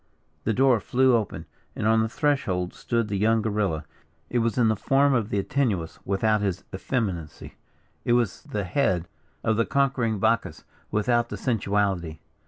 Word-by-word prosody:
The 110 - +2
door 130 -3 +4
flew 130 +4 +3
open, 110 -3 -2 0.3
and - - -3
on 110 0 +4
the 110 - 0
threshold 105 - 0
stood 115 -2 -1
the 100 -2 -2
young 110 +1 +3
guerilla. 100 -8 -1 0.5
It 120 - +2
was 115 -1 0
the 115 -3 +3
form 135 +6 +3
of 115 -4 0
the 100 - -1
Antinuous, 100 -6 -1
without 105 +2 +1
his 95 -2 -2
effeminacy 95 - -3 0.5
it 120 - +2
was 120 -5 +1
the 105 -1 -4
head 90 -3 0 0.4
of 110 -1 +1
the 115 - +2
conquering 130 -5 +1
Bacchus, 115 +3 0 0.3
without 120 +2 +1
the - - -5
sensuality. 100 -8 0
110 Hz, 160 wpm, -25 LUFS, 100-120 Hz, 0.5 s, door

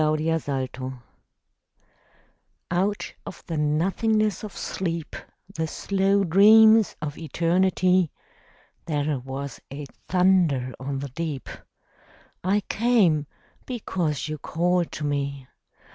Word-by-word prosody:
The 155 -4 0
Call 130 +1 -5 1.8
Out 195 +4 -1
of - - -10
the 165 - -4
nothingness 190 +8 +1
of 210 - -8
sleep, 170 -4 -3 0.4
The 160 -2 -2
slow 195 +3 +1
dreams 215 +4 +6
of 145 -1 -5
Eternity, 180 +2 +2 0.8
There 150 -3 0
was 135 +2 -6
a 145 +1 -6 0.2
thunder 175 -9 +2
on 135 +1 -3
the 140 +1 -5
deep: 150 0 -4 1.0
I 195 +3 +2
came, 200 -11 +2 0.4
because 175 - -2
you 155 -1 -5
called 175 +2 0
to 155 - -5
me. 140 -2 -2
165 Hz, 100 wpm, -25 LUFS, 145-190 Hz, 1.8 s, dreams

